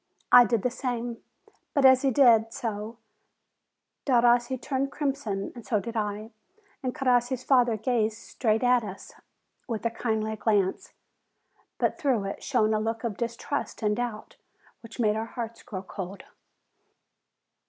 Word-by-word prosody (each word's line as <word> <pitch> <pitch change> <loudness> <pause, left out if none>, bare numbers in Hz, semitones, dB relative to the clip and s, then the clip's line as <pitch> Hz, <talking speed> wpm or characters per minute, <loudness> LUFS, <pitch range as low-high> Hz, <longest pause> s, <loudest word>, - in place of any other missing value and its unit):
I 245 -1 +9
did 225 -1 0
the 250 - +1
same. 240 -2 -3 0.6
But 280 -2 +4
as 260 -1 +7
he 275 - +2
did 230 -4 +5
so, 220 0 -4 1.1
Derossi 240 0 +3
turned 275 +1 -2
crimson, 270 -10 -2
and 240 - -10
so 215 -2 0
did 230 +3 -7
I; 210 +1 -3 0.5
and 255 -2 -3
Crossi's 250 -1 +1
father 245 -5 +3
gazed 220 -1 0
straight 225 0 -1
at 250 -1 +4
us, 195 -2 -9 0.5
with 230 -2 -4
a 230 - +1
kindly 220 -2 -2
glance; 205 -3 0 0.8
but - - 0
through 255 -8 +1
it 195 - -5
shone 215 0 +1
a 215 - +1
look 225 +2 -3
of 230 -4 -2
distrust 235 +3 -4
and 210 0 +2
doubt 235 -2 -5 0.4
which 230 0 -12
made 215 -2 +2
our 220 +1 -3
hearts 230 -1 -5
grow 195 -5 -7
cold. 190 0 -7
230 Hz, 145 wpm, -27 LUFS, 215-245 Hz, 1.1 s, I